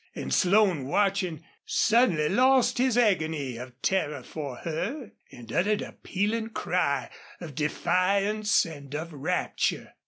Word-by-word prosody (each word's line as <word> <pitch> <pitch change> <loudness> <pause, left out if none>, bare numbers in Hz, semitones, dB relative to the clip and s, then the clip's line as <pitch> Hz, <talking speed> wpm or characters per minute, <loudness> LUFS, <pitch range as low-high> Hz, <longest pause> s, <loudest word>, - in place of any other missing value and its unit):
And - - -4
Slone, 185 -7 +3
watching, 190 -2 0 0.2
suddenly 215 -10 +3
lost 255 +6 +3
his 255 -2 +2
agony 160 - +1
of 125 +1 -10
terror 150 -8 0
for 145 -3 -6
her 205 - -4 0.2
and 115 -2 -11
uttered 205 +3 +1
a - - -8
pealing 220 +4 -2
cry 140 - -1 0.3
of 165 -5 -8
defiance 200 +8 +1
and 145 -4 -9
of 160 +2 -5
rapture. 155 +6 -2
180 Hz, 125 wpm, -27 LUFS, 150-210 Hz, 0.3 s, Slone